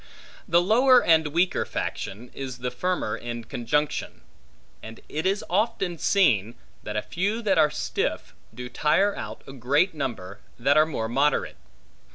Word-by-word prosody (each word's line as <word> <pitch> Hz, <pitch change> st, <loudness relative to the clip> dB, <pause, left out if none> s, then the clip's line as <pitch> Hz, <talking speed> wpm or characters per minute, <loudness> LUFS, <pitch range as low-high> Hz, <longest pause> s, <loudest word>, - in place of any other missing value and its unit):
The 175 Hz, -1 st, +4 dB
lower 250 Hz, +6 st, +5 dB
and 160 Hz, -2 st, +4 dB
weaker 170 Hz, +5 st, +1 dB
faction, 115 Hz, +6 st, -5 dB
is 130 Hz, -2 st, -6 dB
the 125 Hz, 0 st, -4 dB
firmer 150 Hz, -6 st, -2 dB
in 120 Hz, -1 st, -6 dB
conjunction; 145 Hz, +7 st, -2 dB, 0.6 s
and 115 Hz, +1 st, -10 dB
it 155 Hz, +5 st, -2 dB
is 195 Hz, +2 st, -1 dB
often 195 Hz, -3 st, -1 dB
seen, 115 Hz, -, +2 dB, 0.3 s
that 105 Hz, 0 st, -5 dB
a 105 Hz, -, -1 dB
few 205 Hz, +7 st, -2 dB
that 200 Hz, -3 st, +2 dB
are 150 Hz, -, +5 dB
stiff, -, -, -3 dB, 0.2 s
do 125 Hz, 0 st, -7 dB
tire 160 Hz, +10 st, +2 dB
out -, -, -7 dB
a 135 Hz, -, -10 dB
greater 145 Hz, +8 st, +1 dB
number, 105 Hz, -9 st, -5 dB, 0.2 s
that 130 Hz, +4 st, +2 dB
are 155 Hz, +1 st, +5 dB
more 115 Hz, -8 st, -3 dB
moderate. 135 Hz, +5 st, 0 dB
150 Hz, 155 wpm, -25 LUFS, 120-185 Hz, 0.6 s, lower